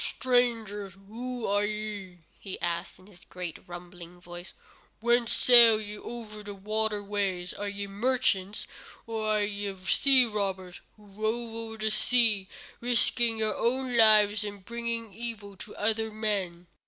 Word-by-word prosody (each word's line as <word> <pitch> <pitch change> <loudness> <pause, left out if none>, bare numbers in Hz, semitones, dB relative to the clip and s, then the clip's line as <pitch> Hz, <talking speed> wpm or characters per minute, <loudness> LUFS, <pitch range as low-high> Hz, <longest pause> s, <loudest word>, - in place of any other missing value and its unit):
"Strangers, 225 -6 0
who 245 +2 -5
are 205 +1 +1
ye?" 205 -4 -5 0.2
he 195 - -7
asked, 170 0 -3
in 185 - -19
his 195 -3 -17
great, 180 -3 -6
rumbling 175 0 -11
voice. 175 +1 -10 0.5
"Whence 235 0 +2
sail 235 -3 +7
ye 210 -1 -7
over 215 -1 -8
the 205 -1 -8
watery 215 +1 -1
ways? 195 -3 -2
Are 205 0 -4
ye 200 0 -5
merchants? 205 -2 -1 0.4
or 225 -1 -3
are 215 -1 +2
ye 205 -1 -4
sea 265 +4 +5
robbers 190 -4 -4 0.2
who 210 - -19
rove 220 +3 -3
over 225 0 -7
the 215 0 -1
sea, 215 -3 +4 0.3
risking 235 -1 +2
your 220 -1 -1
own 255 +1 -1
lives 215 -2 +6
and 200 -2 -7
bringing 235 -2 -4
evil 215 -2 -5
to 210 - -9
other 220 +1 0
men?" 200 -5 -2
210 Hz, 145 wpm, -28 LUFS, 195-230 Hz, 0.5 s, sail